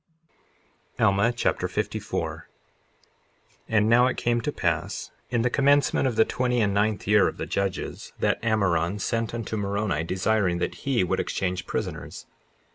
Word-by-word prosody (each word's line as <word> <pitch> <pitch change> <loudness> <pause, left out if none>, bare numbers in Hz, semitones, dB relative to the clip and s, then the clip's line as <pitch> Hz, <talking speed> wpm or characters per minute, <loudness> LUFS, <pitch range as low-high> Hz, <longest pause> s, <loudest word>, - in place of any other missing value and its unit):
Alma 100 +4 +3
Chapter 120 - 0
54 - - -3
54:1 - - -38
And 105 -1 +3
now 120 +2 +5
it 130 - -2
came 120 0 +1
to 150 - -2
pass 85 - -2 0.2
in 120 -2 +1
the 125 - +2
commencement 140 0 +3
of 120 - -1
the 110 - +5
twenty 125 -1 0
and 100 -3 +2
ninth 105 +1 0
year 105 0 +5
of - - -4
the - - -3
judges, 95 -2 -3
that - - 0
Ammoron 100 -5 +1
sent 115 +2 -1
unto 115 -1 -4
Moroni 100 -5 -1
desiring 95 +1 +1
that 90 - -4
he 120 -8 +3
would 90 - 0
exchange 90 -1 -2
prisoners. - - -5
105 Hz, 155 wpm, -25 LUFS, 95-120 Hz, 0.2 s, now